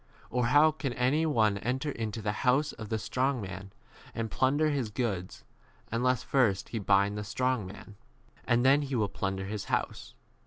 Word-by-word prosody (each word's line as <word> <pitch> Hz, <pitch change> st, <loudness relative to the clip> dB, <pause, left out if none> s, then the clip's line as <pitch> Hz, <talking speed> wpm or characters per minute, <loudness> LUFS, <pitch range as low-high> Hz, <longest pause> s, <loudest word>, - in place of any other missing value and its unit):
Or 125 Hz, -1 st, +1 dB
how 150 Hz, +4 st, +6 dB
can 150 Hz, -4 st, -4 dB
any 135 Hz, +7 st, +1 dB
one 110 Hz, -8 st, +2 dB
enter 130 Hz, +7 st, -2 dB
into 110 Hz, -3 st, -4 dB
the 105 Hz, -, 0 dB
house 135 Hz, +4 st, +2 dB
of 110 Hz, -2 st, -8 dB
the 110 Hz, -, 0 dB
strong 130 Hz, +5 st, -1 dB
man 95 Hz, -1 st, -7 dB, 0.4 s
and 115 Hz, -2 st, -3 dB
plunder 145 Hz, +4 st, +2 dB
his 135 Hz, -6 st, -1 dB
goods, 100 Hz, -5 st, -3 dB, 0.5 s
unless 125 Hz, +1 st, +1 dB
first 115 Hz, -8 st, +1 dB
he 115 Hz, -, -3 dB
bind 100 Hz, +1 st, +2 dB
the -, -, -4 dB
strong 125 Hz, -1 st, -1 dB
man? 100 Hz, +1 st, -12 dB, 0.5 s
and 120 Hz, +1 st, +2 dB
then 140 Hz, +2 st, +5 dB
he 140 Hz, -2 st, -3 dB
will 105 Hz, -4 st, +1 dB
30 -, -, -17 dB
plunder 95 Hz, 0 st, -1 dB
his 105 Hz, +1 st, -4 dB
house. -, -, -3 dB
115 Hz, 185 wpm, -29 LUFS, 105-130 Hz, 0.5 s, how